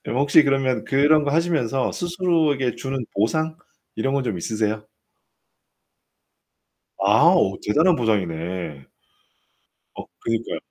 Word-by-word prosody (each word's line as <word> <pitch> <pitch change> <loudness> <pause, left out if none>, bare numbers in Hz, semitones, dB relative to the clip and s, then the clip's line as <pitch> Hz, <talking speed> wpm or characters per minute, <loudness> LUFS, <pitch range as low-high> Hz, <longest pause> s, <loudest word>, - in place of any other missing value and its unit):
그럼 120 - -3
혹시 145 +2 +5
그러면 135 -5 0
그런 145 +2 +3
거 145 - -1
하시면서 155 -7 0
스스로에게 165 -7 0
주는 135 0 -4 0.2
보상 155 +10 0 0.4
이런 135 +5 -1
거 140 - +1
좀 110 -6 -3
있으세요? 110 +2 -2 2.2
아. 110 - +5
오, 95 - +1
대단한 160 - +3
보상이네. 90 - -3 1.1
어, - - -9
그니까요. 115 0 -3
135 Hz, 250 characters per minute, -22 LUFS, 105-155 Hz, 2.2 s, 혹시